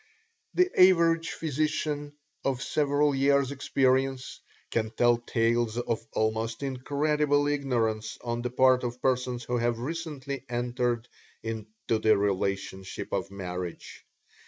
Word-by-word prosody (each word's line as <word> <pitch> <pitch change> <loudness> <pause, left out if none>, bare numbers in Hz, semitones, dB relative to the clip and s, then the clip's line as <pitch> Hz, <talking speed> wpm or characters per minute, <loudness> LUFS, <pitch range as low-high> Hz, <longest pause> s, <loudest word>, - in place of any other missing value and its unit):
The 365 +1 +4
average 165 -3 +5
physician 150 -1 -2 0.3
of 130 -2 -1
several 145 0 +2
years' 140 0 +3
experience 135 -1 0 0.3
can 110 -1 0
tell 120 +1 +3
tales 120 -1 0
of 115 -2 -1
almost 110 +3 -1
incredible 145 +2 +1
ignorance 120 -7 -1
on 120 0 -2
the 125 - -2
part 130 +1 +4
of 120 0 -3
persons 125 -1 0
who 120 +1 -1
have 120 0 +1
recently 140 -1 -5
entered 120 -1 -1 0.4
into 110 0 -3
the 110 -1 +4
relationship 95 -1 -2
of 95 -1 -1
marriage. 90 -2 -6
125 Hz, 115 wpm, -28 LUFS, 115-140 Hz, 0.4 s, average